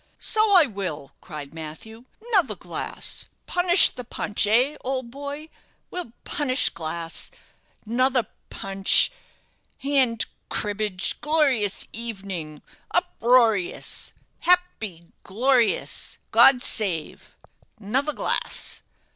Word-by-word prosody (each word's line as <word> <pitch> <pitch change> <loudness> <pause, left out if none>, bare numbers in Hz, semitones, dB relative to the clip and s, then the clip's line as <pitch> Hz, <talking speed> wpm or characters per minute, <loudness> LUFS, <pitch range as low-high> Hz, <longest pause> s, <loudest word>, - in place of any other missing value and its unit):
"So 435 -1 +3
I 345 -4 +7
will," 185 - -6
cried 150 -4 -9
Matthew; 165 +9 -10 0.3
"'nother 385 -6 +2
glass - - -4 0.2
punish 355 0 +7
the 250 - -8
punch 210 -2 0
eh 250 +7 +2
old 260 -2 -4
boy? 285 +3 -7 0.4
We'll 355 -11 -6
punish 280 -2 +1
glass 165 +1 -5 0.6
'nother 250 +2 +1 0.2
punch 195 - +3 0.7
hand 265 -5 +1 0.2
cribbage 205 -3 -1
glorious 275 -10 0
evenin' 195 -9 -7 0.3
uproarious 230 -6 +1 0.2
happy 340 - +1 0.2
glorious 240 +3 0
God 255 -2 +6
save 180 -8 0 0.4
'nother 265 +9 -1
glass." - - -2
230 Hz, 90 wpm, -23 LUFS, 195-275 Hz, 0.7 s, I